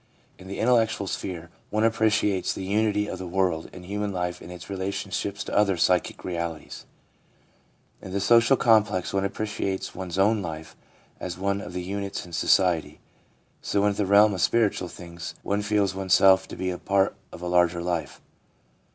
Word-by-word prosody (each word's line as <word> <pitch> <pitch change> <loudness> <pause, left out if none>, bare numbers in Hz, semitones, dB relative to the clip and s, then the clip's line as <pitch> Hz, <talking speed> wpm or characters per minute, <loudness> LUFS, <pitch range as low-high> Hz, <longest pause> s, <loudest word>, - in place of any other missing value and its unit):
In 95 - -12
the 100 - -6
intellectual 115 -3 +2
sphere, 85 -3 -5 0.2
one 110 +1 0
appreciates 110 -3 +2
the - - -6
unity 105 +1 +1
of - - -5
the 95 - -6
world, 90 -3 0
and 90 -1 -11
human 105 +2 -3
life 90 -2 -3
in - - -10
its 90 -1 -9
relationships 100 +1 -3
to - - -5
other 100 -3 +3
physical 90 +2 +1
realities; 85 -2 -5 1.1
in 95 - -9
the 100 - -1
social 115 +5 +5
complex, 105 -6 +2
one 100 0 +1
appre 110 - -4
ciates 100 -2 -3
one's 90 -1 -5
own 105 +2 +3
life 80 -3 -7 0.4
as 90 -2 -5
one 100 +1 -1
of 90 - -8
the 90 0 -4
units 100 +1 -4
in 85 - -13
society; 80 -2 +2 0.6
so, 100 0 0
in 105 - +3
the 100 -1 -1
realm 100 +1 +6
of 95 - -3
spiritual 110 -5 +2
things, 85 -1 -9
one 100 +1 0
feels 105 -2 +1
oneself 95 0 +4
to - - -8
be 90 0 -2
a 90 - -5
part 100 -1 +1 0.2
of 90 - -10
a - - -3
larger 90 -1 +2
life. 85 -2 -3
95 Hz, 175 wpm, -25 LUFS, 90-105 Hz, 1.1 s, realm